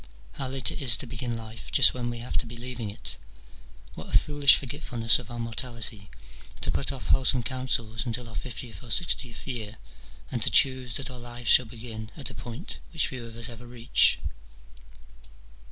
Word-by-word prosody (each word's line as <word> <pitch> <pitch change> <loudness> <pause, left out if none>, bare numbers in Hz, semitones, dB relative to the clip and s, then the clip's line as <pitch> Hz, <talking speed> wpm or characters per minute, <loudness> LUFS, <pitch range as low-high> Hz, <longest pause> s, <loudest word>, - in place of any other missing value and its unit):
How 135 - -6
late 130 0 +3
it - - -6
is 120 -7 +8
to - - -1
begin 120 -1 -5
life 110 0 -9
just 140 - +7
when 120 -1 -4
we 120 - -6
have 120 +2 -7
to 120 - 0
be 120 +1 -8
leaving 120 -3 -5
it! 100 - -6 0.7
What - - -10
a - - +5
foolish 145 -2 +6
f 140 - -3
orget 145 +6 -7
fulness 115 -5 +3
of 125 - -11
our 120 - -7
mortality, 115 -3 -3 0.5
to - - +1
put - - -1
off 85 - -8
wholesome 130 - +3
counsels 120 -4 -1
until 120 0 -4
our 115 - -10
fiftieth 120 +3 -6
or 120 - -12
sixtieth 120 - +1
year, 115 -4 -6 0.5
and - - -3
to - - +5
choose 130 -2 +4
that 135 -1 -1
our 125 - -7
lives 120 -1 -1
shall 125 - +6
begin 110 -1 -8
at 140 - -4
a - - -11
point 120 - -7
which 160 -3 +1
few 130 -3 -8
of 115 - -12
us 115 0 -1
ever 120 0 -10
reach. 120 -1 +3
120 Hz, 200 wpm, -26 LUFS, 115-130 Hz, 0.7 s, is